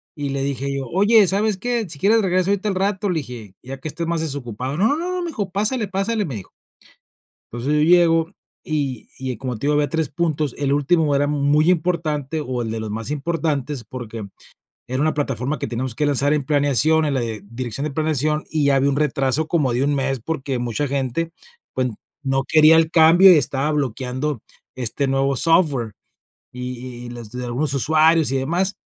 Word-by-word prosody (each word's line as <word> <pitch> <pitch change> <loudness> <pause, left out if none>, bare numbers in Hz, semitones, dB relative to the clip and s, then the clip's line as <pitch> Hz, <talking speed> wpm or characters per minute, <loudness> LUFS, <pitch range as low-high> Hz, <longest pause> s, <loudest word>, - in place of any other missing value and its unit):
Y 145 -2 -4
le 135 0 -2
dije 140 -1 -2
yo: 135 -1 -3
"Oye, 205 +3 +5
¿sabes 205 +1 +1
qué?, 235 -1 -2
si 150 - -7
quieres 220 +5 +4
regreso 185 0 +1
ahorita 200 +1 0
al 195 - -2
rato", 195 +1 0
le 170 - 0
dije, 115 -7 -10
ya 135 +1 -7
que 155 - -6
estés 170 +3 -4
más 165 -1 -1
desocupado: 135 -2 -4
"No", 335 - 0
me - - -3
dijo: 205 - -4
"Pásale, 215 +3 -1
pásale", 200 +3 -1
me 135 -8 -5
dijo 95 - -8 1.0
entonces, 120 +6 -2
yo 150 - +3
llego, 165 0 +4 0.3
y 140 -6 -3
y 130 -2 -4
como 125 -2 -4
te 130 - -5
digo, 150 - +2
había 145 -1 +1
3 160 0 -1
puntos. 155 -3 -1
El 140 -1 -1
último 145 +1 +2
era 145 +1 +2
muy 150 +3 +3
importante, 155 -4 -1
o 125 -1 -3
el 115 - -3
de 110 0 -3
los 110 -1 -5
más 115 +4 -5
importantes, 150 -3 -2
porque 115 -5 -7 0.6
era 130 +2 -3
una 155 +1 +1
plataforma 135 0 -2
que - - -3
teníamos 120 0 -4
que 150 - +1
lanzar 145 +1 +2
en 150 -3 0
planeación, 145 +2 +3
en 145 - 0
la 130 - +1
dirección 115 +4 -4
de 150 - -2
planeación, 155 0 0
y 150 -3 +1
ya 140 -1 +4
había 135 +1 +2
un 140 - 0
retraso 150 0 +1
como 145 -8 +1
de 125 +3 0
1 145 +1 +1
mes, 135 -2 0
porque 135 -2 -3
mucha 120 +4 -1
gente, 140 +4 -2 0.4
pues, 130 -1 0 0.3
no 135 -1 0
quería 155 +1 +6
el 160 -1 +3
cambio 175 +3 +7
y - - +6
estaba 145 +1 0
bloqueando 130 0 -2 0.4
este 130 +3 -1
nuevo 135 +1 +1
software. 145 - +2 0.6
Y 125 -1 -7
y - - -7
los 120 -2 -9
de 125 0 -5
algunos 135 +4 -2
usuarios 155 +4 +3
y 135 - 0
demás, 175 +9 0
145 Hz, 195 wpm, -21 LUFS, 130-165 Hz, 1.0 s, cambio